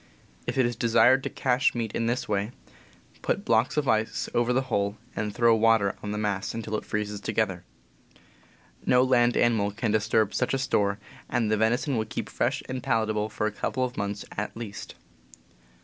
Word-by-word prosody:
If -, -, -2 dB
it 130 Hz, -, +4 dB
is 120 Hz, 0 st, -1 dB
desired 120 Hz, +3 st, +4 dB
to -, -, -3 dB
cache 125 Hz, 0 st, +1 dB
meat 115 Hz, -3 st, -2 dB
in 115 Hz, -, -1 dB
this 120 Hz, +2 st, -1 dB
way, 105 Hz, +2 st, -1 dB, 0.7 s
put -, -, -1 dB
blocks 115 Hz, +5 st, +2 dB
of 145 Hz, -2 st, +1 dB
ice 110 Hz, -1 st, +1 dB
over 120 Hz, +1 st, +2 dB
the 130 Hz, +2 st, +2 dB
hole 100 Hz, -5 st, -1 dB, 0.2 s
and 105 Hz, -1 st, -2 dB
throw 115 Hz, +1 st, +4 dB
water 110 Hz, -3 st, +3 dB
on 105 Hz, -, -5 dB
the 105 Hz, -, -3 dB
mass 105 Hz, -2 st, -2 dB
until 110 Hz, -1 st, -5 dB
it -, -, -4 dB
freezes 105 Hz, -1 st, -3 dB
together. 100 Hz, -5 st, -1 dB, 1.2 s
No 125 Hz, 0 st, +4 dB
land 120 Hz, -2 st, +3 dB
animal 110 Hz, -4 st, +3 dB
can 110 Hz, +2 st, -2 dB
disturb 110 Hz, 0 st, +2 dB
such 125 Hz, +1 st, 0 dB
a -, -, +1 dB
store, 100 Hz, -6 st, +1 dB, 0.3 s
and 115 Hz, -4 st, 0 dB
the -, -, +4 dB
venison 120 Hz, +5 st, +1 dB
will 110 Hz, -, 0 dB
keep -, -, -5 dB
fresh -, -, -1 dB
and 130 Hz, 0 st, -4 dB
palatable 110 Hz, -2 st, 0 dB
for 105 Hz, -, -2 dB
a 110 Hz, -, 0 dB
couple 130 Hz, +5 st, -2 dB
of 125 Hz, 0 st, -6 dB
months 100 Hz, 0 st, -3 dB
at 105 Hz, -, -4 dB
least. 110 Hz, -4 st, -7 dB
110 Hz, 190 wpm, -27 LUFS, 105-120 Hz, 1.2 s, it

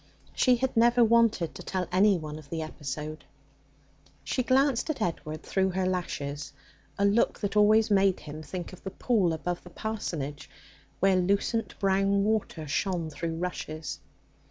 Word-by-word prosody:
She 250 Hz, -2 st, +4 dB
had 260 Hz, +2 st, -1 dB
never 240 Hz, +1 st, +5 dB
wanted 225 Hz, -7 st, +3 dB
to -, -, -9 dB
tell 185 Hz, -2 st, -3 dB
anyone 180 Hz, -6 st, +2 dB
of 145 Hz, -2 st, -15 dB
the 160 Hz, -1 st, -3 dB
episode. 150 Hz, 0 st, -6 dB, 1.0 s
She 255 Hz, -, -1 dB
glanced 260 Hz, +1 st, +2 dB
at 310 Hz, -, -2 dB
Edward 155 Hz, -5 st, -3 dB
through 190 Hz, -1 st, +1 dB
her 190 Hz, 0 st, 0 dB
lashes 150 Hz, -6 st, -3 dB, 0.4 s
a 200 Hz, -, +2 dB
look 205 Hz, +3 st, +2 dB
that 205 Hz, -1 st, -2 dB
always 215 Hz, +1 st, +5 dB
made 195 Hz, -2 st, +3 dB
him 150 Hz, +1 st, -8 dB
think 175 Hz, +4 st, -6 dB
of 185 Hz, -, -13 dB
the 190 Hz, -, -4 dB
pool 200 Hz, -4 st, +1 dB
above 175 Hz, +2 st, -3 dB
the 180 Hz, -, -12 dB
parsonage, 170 Hz, -8 st, -4 dB, 0.5 s
where 195 Hz, 0 st, +4 dB
lucent 200 Hz, +5 st, 0 dB
brown 195 Hz, 0 st, +2 dB
water 210 Hz, -7 st, -1 dB
shone 165 Hz, +1 st, -1 dB
through 165 Hz, +2 st, -4 dB
rushes. 160 Hz, -2 st, -4 dB
190 Hz, 155 wpm, -28 LUFS, 160-215 Hz, 1.0 s, never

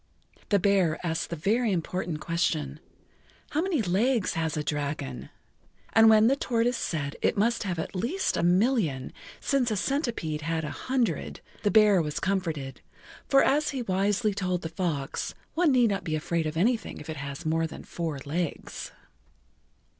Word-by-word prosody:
The 205 Hz, -, +4 dB
bear 190 Hz, -5 st, +2 dB
asked 165 Hz, -1 st, -1 dB
the 170 Hz, -, -3 dB
very 215 Hz, +8 st, +1 dB
important 175 Hz, -2 st, -2 dB
question: 155 Hz, -4 st, -1 dB, 0.7 s
"How 305 Hz, -, +1 dB
many 340 Hz, -, 0 dB
legs 210 Hz, +4 st, +1 dB
has 160 Hz, -1 st, -1 dB
a 150 Hz, -, -1 dB
dragon?" 140 Hz, -2 st, -3 dB, 0.6 s
And 225 Hz, 0 st, +7 dB
when 215 Hz, 0 st, +6 dB
the 260 Hz, +4 st, +4 dB
tortoise 245 Hz, -2 st, 0 dB
said 150 Hz, -9 st, -3 dB
it -, -, +1 dB
must 230 Hz, +3 st, +2 dB
have 185 Hz, -4 st, -2 dB
at 160 Hz, -, -4 dB
least 265 Hz, -, 0 dB
a -, -, 0 dB
million, 180 Hz, -, +2 dB, 0.3 s
since 270 Hz, -4 st, +1 dB
a 215 Hz, -, 0 dB
centipede 230 Hz, -, -1 dB
had 165 Hz, +1 st, -1 dB
a -, -, -4 dB
hundred, 255 Hz, -2 st, -1 dB, 0.2 s
the 205 Hz, -, +2 dB
bear 210 Hz, -3 st, +6 dB
was 150 Hz, -2 st, -3 dB
comforted, 165 Hz, -8 st, -2 dB, 0.5 s
for 275 Hz, -, +5 dB
as 295 Hz, +3 st, +2 dB
he 265 Hz, -3 st, -3 dB
wisely 205 Hz, +2 st, +1 dB
told 185 Hz, -2 st, -2 dB
the 160 Hz, -, -3 dB
fox, 160 Hz, -7 st, -3 dB, 0.2 s
one 330 Hz, -2 st, +3 dB
need 245 Hz, -4 st, +4 dB
not 195 Hz, 0 st, -2 dB
be 155 Hz, -, -1 dB
afraid 160 Hz, +1 st, -1 dB
of 155 Hz, +1 st, -4 dB
anything 225 Hz, +4 st, 0 dB
if 150 Hz, -, -10 dB
it 160 Hz, -1 st, -5 dB
has 140 Hz, +4 st, -6 dB
more 165 Hz, +1 st, +1 dB
than 160 Hz, -, -10 dB
four 165 Hz, -4 st, -4 dB
legs. 160 Hz, +2 st, -4 dB
185 Hz, 170 wpm, -27 LUFS, 160-230 Hz, 0.7 s, And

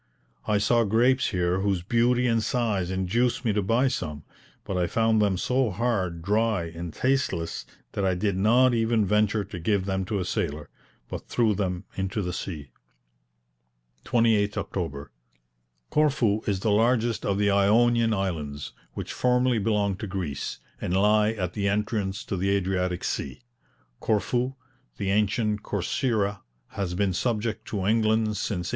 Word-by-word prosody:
I 105 Hz, -1 st, +3 dB
saw 115 Hz, +3 st, +3 dB
grapes 120 Hz, +5 st, +3 dB
here 90 Hz, -1 st, 0 dB
whose 95 Hz, -3 st, 0 dB
beauty 120 Hz, +4 st, +2 dB
and 115 Hz, -2 st, +2 dB
size 110 Hz, -7 st, 0 dB
induced 110 Hz, +7 st, 0 dB
me 110 Hz, -, +2 dB
to 105 Hz, -, +1 dB
buy 115 Hz, +7 st, +2 dB
some; 75 Hz, -, -3 dB, 0.4 s
but 95 Hz, -, -4 dB
I 90 Hz, -1 st, +1 dB
found 110 Hz, +1 st, +2 dB
them 100 Hz, -3 st, +2 dB
so 125 Hz, +5 st, +1 dB
hard, 95 Hz, -6 st, -1 dB
dry, 105 Hz, 0 st, +1 dB
and 85 Hz, 0 st, -6 dB
tasteless, 110 Hz, -9 st, -1 dB, 0.2 s
that 100 Hz, -, -2 dB
I 95 Hz, -1 st, +2 dB
did 100 Hz, +1 st, 0 dB
not 120 Hz, +6 st, +4 dB
even 115 Hz, -2 st, +2 dB
venture 105 Hz, +1 st, +2 dB
to 95 Hz, -2 st, -8 dB
give 95 Hz, +2 st, 0 dB
them 95 Hz, -1 st, -1 dB
to 105 Hz, +2 st, -2 dB
a 95 Hz, -, -2 dB
sailor, 75 Hz, -3 st, -3 dB, 0.4 s
but -, -, -7 dB
threw 115 Hz, -3 st, +2 dB
them 90 Hz, -3 st, -2 dB
into 95 Hz, +2 st, -2 dB
the 90 Hz, 0 st, -3 dB
sea. 75 Hz, -8 st, -6 dB, 1.3 s
28th 110 Hz, -3 st, +2 dB
October. 70 Hz, -7 st, -4 dB, 0.8 s
Corfu 130 Hz, -9 st, +2 dB
is 100 Hz, -2 st, 0 dB
the 110 Hz, -, +1 dB
largest 115 Hz, +1 st, +2 dB
of 100 Hz, -, 0 dB
the 100 Hz, 0 st, +2 dB
Ionian 115 Hz, +4 st, +4 dB
Islands, 80 Hz, -8 st, -3 dB, 0.2 s
which -, -, -5 dB
formerly 125 Hz, -1 st, +2 dB
belonged 100 Hz, -2 st, 0 dB
to 105 Hz, -, -4 dB
Greece, 90 Hz, -7 st, -4 dB, 0.2 s
and 90 Hz, +2 st, 0 dB
lie 105 Hz, +2 st, +4 dB
at 90 Hz, -5 st, -3 dB
the 100 Hz, -2 st, -1 dB
entrance 105 Hz, -1 st, -1 dB
to 100 Hz, -, -4 dB
the 95 Hz, +2 st, 0 dB
Adriatic 90 Hz, -2 st, 0 dB
sea. -, -, -3 dB, 0.6 s
Corfu, 120 Hz, +5 st, 0 dB, 0.4 s
the 95 Hz, -1 st, -1 dB
ancient 105 Hz, +1 st, +1 dB
Corcyra, 105 Hz, -, -1 dB, 0.3 s
has 95 Hz, -3 st, -3 dB
been 100 Hz, 0 st, +1 dB
subject 110 Hz, +2 st, -1 dB
to 100 Hz, -3 st, -3 dB
England 110 Hz, 0 st, +2 dB
since -, -, -2 dB
1815. 90 Hz, -3 st, -3 dB
105 Hz, 155 wpm, -26 LUFS, 95-115 Hz, 1.3 s, not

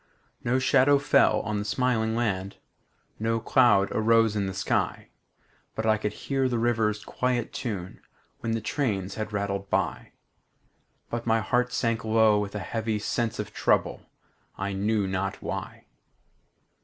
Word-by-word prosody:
No 125 Hz, +2 st, +1 dB
shadow 130 Hz, +2 st, +4 dB
fell 140 Hz, -, +3 dB
on 105 Hz, -1 st, -2 dB
the -, -, -2 dB
smiling 110 Hz, 0 st, 0 dB
land, 100 Hz, -5 st, -2 dB, 0.6 s
No 115 Hz, +1 st, 0 dB
cloud 110 Hz, -5 st, +4 dB
arose 115 Hz, 0 st, +3 dB
in 100 Hz, -2 st, 0 dB
the 95 Hz, -, -4 dB
sky; 95 Hz, -, -1 dB, 0.7 s
I 110 Hz, -1 st, +2 dB
could 105 Hz, -1 st, -2 dB
hear 135 Hz, +1 st, -1 dB
the 120 Hz, -, 0 dB
river's 110 Hz, -3 st, 0 dB
quiet 125 Hz, -2 st, -1 dB
tune 95 Hz, -6 st, -5 dB, 0.4 s
When 115 Hz, -1 st, -2 dB
the 115 Hz, -, -1 dB
trains 100 Hz, -10 st, -2 dB
had 110 Hz, -1 st, -4 dB
rattled 100 Hz, -1 st, -3 dB
by; -, -, -1 dB, 1.0 s
But 120 Hz, 0 st, -3 dB
my 115 Hz, 0 st, +3 dB
heart 125 Hz, +4 st, 0 dB
sank 115 Hz, -2 st, 0 dB
low 110 Hz, -1 st, +4 dB
with 105 Hz, 0 st, -4 dB
a -, -, -2 dB
heavy 110 Hz, -1 st, -2 dB
sense 110 Hz, +2 st, -2 dB
Of 105 Hz, -, -5 dB
trouble, -, -, 0 dB, 0.5 s
I 100 Hz, +1 st, -3 dB
knew 105 Hz, +1 st, 0 dB
not 95 Hz, +1 st, -2 dB
why. -, -, -6 dB
110 Hz, 145 wpm, -27 LUFS, 105-120 Hz, 1.0 s, shadow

